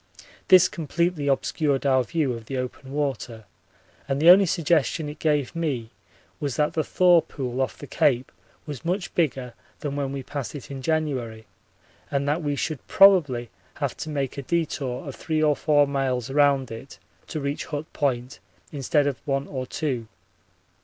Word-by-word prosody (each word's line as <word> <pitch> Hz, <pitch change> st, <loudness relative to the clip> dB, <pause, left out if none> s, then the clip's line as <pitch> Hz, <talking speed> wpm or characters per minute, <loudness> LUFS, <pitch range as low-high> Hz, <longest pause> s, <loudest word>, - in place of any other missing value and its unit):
This 185 Hz, -1 st, +7 dB
completely 170 Hz, -2 st, -1 dB
obscured 140 Hz, 0 st, 0 dB
our 130 Hz, -2 st, +4 dB
view 155 Hz, -4 st, -1 dB
of 115 Hz, -1 st, -8 dB
the 135 Hz, -, -3 dB
open 130 Hz, +1 st, -5 dB
water, 130 Hz, -6 st, -3 dB, 0.6 s
and 135 Hz, 0 st, -1 dB
the 165 Hz, +3 st, +9 dB
only 195 Hz, +1 st, +7 dB
suggestion 160 Hz, -2 st, +1 dB
it 150 Hz, -, -8 dB
gave 150 Hz, -1 st, 0 dB
me 135 Hz, -9 st, -2 dB, 0.5 s
was 140 Hz, -4 st, -2 dB
that 150 Hz, 0 st, +1 dB
the 160 Hz, -, 0 dB
thaw 175 Hz, 0 st, +5 dB
pool 130 Hz, -4 st, -4 dB
off 130 Hz, -, -2 dB
the -, -, -9 dB
Cape 130 Hz, -2 st, +1 dB, 0.3 s
was 145 Hz, -5 st, -7 dB
much 180 Hz, +2 st, -2 dB
bigger 130 Hz, -7 st, 0 dB, 0.3 s
than 145 Hz, -2 st, -3 dB
when 140 Hz, -2 st, -2 dB
we 135 Hz, -1 st, -5 dB
passed 140 Hz, +1 st, -5 dB
it 140 Hz, -1 st, -8 dB
in 135 Hz, -1 st, -6 dB
January 130 Hz, -8 st, -2 dB, 0.6 s
and 140 Hz, 0 st, -1 dB
that 150 Hz, +4 st, +1 dB
we 145 Hz, -2 st, -1 dB
should 150 Hz, -1 st, -4 dB
probably 150 Hz, -, +5 dB, 0.2 s
have 140 Hz, -3 st, -2 dB
to 155 Hz, -, -5 dB
make 140 Hz, -2 st, -2 dB
a -, -, -3 dB
detour 140 Hz, -4 st, -2 dB
of 140 Hz, -, -5 dB
three 155 Hz, -1 st, -1 dB
or 150 Hz, -1 st, +4 dB
four 145 Hz, -1 st, +3 dB
miles 135 Hz, -3 st, -1 dB
round 140 Hz, -3 st, +3 dB
it 115 Hz, +4 st, -9 dB, 0.3 s
to 155 Hz, -, -4 dB
reach 140 Hz, 0 st, -3 dB
Hut 150 Hz, 0 st, -4 dB
Point 130 Hz, -3 st, -1 dB, 0.3 s
instead 145 Hz, +1 st, +1 dB
of 140 Hz, -2 st, -2 dB
one 135 Hz, -1 st, 0 dB
or 130 Hz, -3 st, -5 dB
two. 130 Hz, -8 st, -3 dB
140 Hz, 175 wpm, -25 LUFS, 130-155 Hz, 0.6 s, the